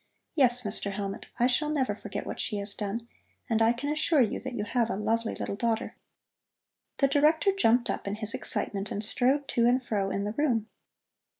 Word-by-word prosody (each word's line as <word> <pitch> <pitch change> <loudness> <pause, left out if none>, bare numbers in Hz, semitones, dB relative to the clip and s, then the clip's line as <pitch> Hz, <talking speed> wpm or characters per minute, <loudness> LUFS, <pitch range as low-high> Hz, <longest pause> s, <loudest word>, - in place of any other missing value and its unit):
Yes, 250 -5 +3
Mr. 200 -1 +3
Hellmut, 195 0 -5
I 240 - +4
shall 260 +4 +1
never 285 -4 0
forget - - -6
what - - -6
she 210 - -2
has 200 0 -1
done, 215 +3 -4 0.4
and 225 -1 +1
I 225 +1 +5
can 245 +4 -4
assure 310 0 +2
you 220 - -2
that 260 -1 -6
you 210 - -2
have 235 +1 0
a - - -1
lovely 225 +2 -1
little - - -4
daughter." 225 +1 -1 1.0
The 275 - +4
Director 305 +7 +3
jumped 245 - +3
up - - -3
in 200 - -1
his 215 0 -3
excitement 200 -1 -2
and 205 - -1
strode 265 +6 +1
to 235 0 +3
and 250 +1 +2
fro 200 -4 -1
in 195 +1 -2
the 205 - -2
room. 235 -5 0
235 Hz, 200 wpm, -28 LUFS, 210-260 Hz, 1.0 s, I